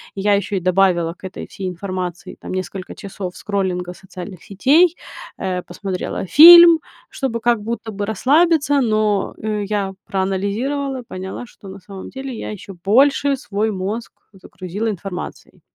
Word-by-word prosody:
Я 200 +1 +2
еще 200 +1 -3
и - - 0
добавила 180 -2 +2
к 190 - -9
этой 190 - -9
всей 190 - -6
информации 180 -1 -5
там - - -7
несколько 185 0 -5
часов 190 -2 -7
скроллинга 185 -3 -2
социальных 185 -1 -10
сетей, 300 - +4 0.4
э, 185 -1 -2
посмотрела 185 +1 -5
фильм 340 - +10 0.3
чтобы 255 -4 -3
как 235 -2 +2
будто 225 +1 -5
бы 205 0 -3
расслабиться, 290 - +3
но, 215 -3 0
э, 210 -1 -3
я 200 -2 -2
проанализировала, 220 +9 -2
поняла 190 +6 -6
что 220 -4 -16
на 195 +1 -9
самом 190 0 -10
деле 265 +1 -7
я 225 - -6
еще 210 -1 -10
больше 275 +5 +3
свой 215 -4 -2
мозг 205 +4 -4 0.2
загрузила 195 +3 -5
информацией. 195 -2 -7
200 Hz, 145 wpm, -19 LUFS, 185-240 Hz, 0.4 s, фильм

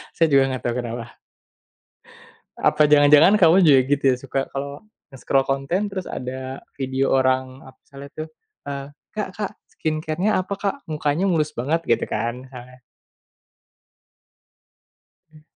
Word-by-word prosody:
Saya 165 - +3
juga 135 -1 +5
gak - - -15
tahu 120 0 0
kenapa. 120 0 -7 1.4
Apa 150 - +3
jangan-jangan 150 +7 +6
kamu 175 +2 +6
juga 140 -4 +7
gitu 145 0 +1
ya - - 0
suka 135 0 -2
kalau 140 +6 -6 0.2
nge-scroll 135 0 0
konten 140 +10 -1
terus 190 -2 -5
ada 130 +1 -6 0.2
video 135 0 -1
orang 130 0 0
ap 130 0 -16
misalnya 140 0 -12
tuh, 155 0 -6 0.4
eee, 140 -1 -5 0.3
"Kak 210 -3 -3
Kak, 210 0 -3 0.2
skincare-nya 155 +6 -1
apa, 185 +2 -6
Kak? 200 +5 -1
Mukanya 155 +2 -1
mulus 155 -5 0
banget", 150 +8 0
gitu 115 - +2
kan 120 +2 -3
misalnya. 125 -1 -13 2.5
Hmm. 155 -1 -19
140 Hz, 135 wpm, -22 LUFS, 130-160 Hz, 2.5 s, juga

